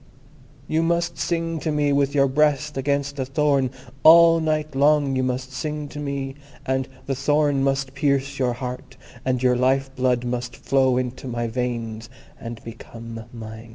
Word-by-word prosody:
You 160 +1 +1
must 170 0 0
sing 165 -1 -1
to 155 - -2
me 145 -1 +1
with 140 0 +1
your 140 -1 +4
breast 150 +1 +1
against 140 +1 -1
a 130 - 0
thorn. 140 -2 +2 0.3
All 165 +3 +8
night 155 -1 -1
long 145 -1 +3
you 130 - +1
must 130 +1 -2
sing 150 +3 -4
to 150 - -8
me, 140 -2 -3 0.3
and 130 0 0 0.2
the 135 - -1
thorn 145 0 +1
must 135 -1 0
pierce 140 0 0
your 125 -2 +1
heart, 125 +1 -7 0.3
and 130 -1 -1
your 125 -1 +4
life 135 +2 +1
blood 125 -1 +1
must 120 -1 -3
flow 130 -2 +2
into 130 +1 -3
my 120 -1 -2
veins, 115 -1 -3 0.3
and 115 -1 -8
become 115 0 -9
mine." 110 0 -9
135 Hz, 165 wpm, -23 LUFS, 125-145 Hz, 0.3 s, All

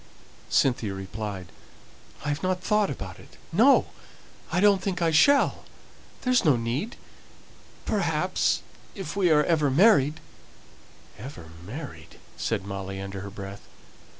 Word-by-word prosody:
Cynthia 115 -6 +1
replied, 95 -2 -6 0.7
"I've 145 0 -1
not 185 0 0
thought 210 -1 +2
about 95 -9 -7
it - - -16 0.2
no! - - +6 0.7
I 175 - +1
don't 200 -1 +5
think 190 -2 -2
I 165 -2 +2
shall 280 - +4 0.6
there's 255 -1 +3
no 150 -6 +5
need. 120 - -2 0.9
Perhaps, - - 0 0.3
if 190 -5 -6
we 190 -3 +3
are 150 -1 +5
ever 155 -4 +2
married 155 -2 +4 0.5
" - - -24
"Ever 90 - -9
married!" 105 - -9 0.2
said 105 -4 -2
Molly, 95 -1 -5
under 95 0 -6
her 100 +1 -6
breath. 100 0 -9
140 Hz, 125 wpm, -26 LUFS, -, 0.9 s, no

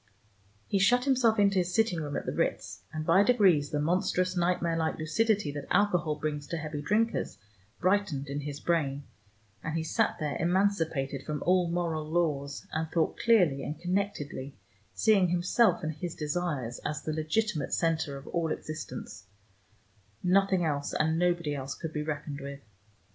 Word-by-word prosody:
He 200 - 0
shut 245 +6 +4
himself 245 -5 +3
into 200 -2 +4
his 180 0 -1
sitting 220 -7 +2
room 145 -2 -4
at - - -4
the - - -2
Ritz, - - -2
and 155 0 -4
by 170 +5 +5
degrees 195 -11 +4
the 150 - -1
monstrous 180 +3 +1
nightmare 175 -1 +1
like 160 -1 -1
lucidity 200 +2 +1
that 145 -1 -6
alcohol 180 -5 +2
brings 150 -1 -3
to 170 - -3
heavy 150 -1 -4
drinkers 215 +9 0 0.4
brightened 185 -7 +1
in 140 +1 -3
his 145 0 -5
brain, 145 -5 0 0.6
and 160 +1 -2
he 160 - -1
sat 160 - 0
there 150 -2 -2
emancipated 165 -7 0
from 150 0 -4
all 180 -1 +3
moral 170 -2 -1
laws, 150 -4 -1
and 160 0 -2
thought 165 -1 0
clearly 180 -12 +4
and 150 +1 -5
connectedly, 175 -7 -3 0.4
seeing 205 -4 +4
himself 180 +6 +2
and 155 +1 -2
his 165 +3 -5
desires 150 -6 -2
as 150 - -3
the 155 - -2
legitimate 155 0 -1
center 160 -4 0
of 135 - -11
all 165 -2 -1
existence; 155 0 -6 1.0
nothing 190 -1 +3
else 145 -2 -1
and 160 +1 +1
nobody 175 -4 +1
else 135 -1 -4
could 160 -1 -6
be 150 - -2
reckoned 150 -1 -4
with. 140 0 -7
165 Hz, 165 wpm, -29 LUFS, 150-185 Hz, 1.0 s, by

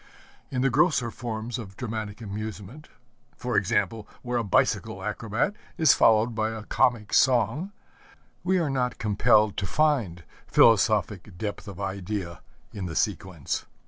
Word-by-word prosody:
In 130 -1 -1
the 135 - +2
grosser 140 -4 +2
forms 115 +1 -5
of 95 -4 -9
dramatic 110 -3 -5
amusement 110 +5 -7 0.5
for 125 - -3
example, 105 +2 0 0.2
where 120 -1 -1
a - - -1
bicycle 100 - 0
acrobat 115 - -1 0.2
is 160 - +6
followed 110 +2 +4
by 110 0 0
a 110 -1 -6
comic 110 -1 +1
song 130 - +2 0.7
we 185 +1 +2
are 160 -5 0
not 125 -2 -1
compelled 105 0 +3
to 95 - -2
find 120 - +1 0.2
philosophic 105 -3 +3
depth 105 +2 -5
of 100 -4 -8
idea 95 -2 -4 0.3
in 95 -3 -5
the 80 - -6
sequence. 85 -4 -2
110 Hz, 140 wpm, -26 LUFS, 100-125 Hz, 0.7 s, is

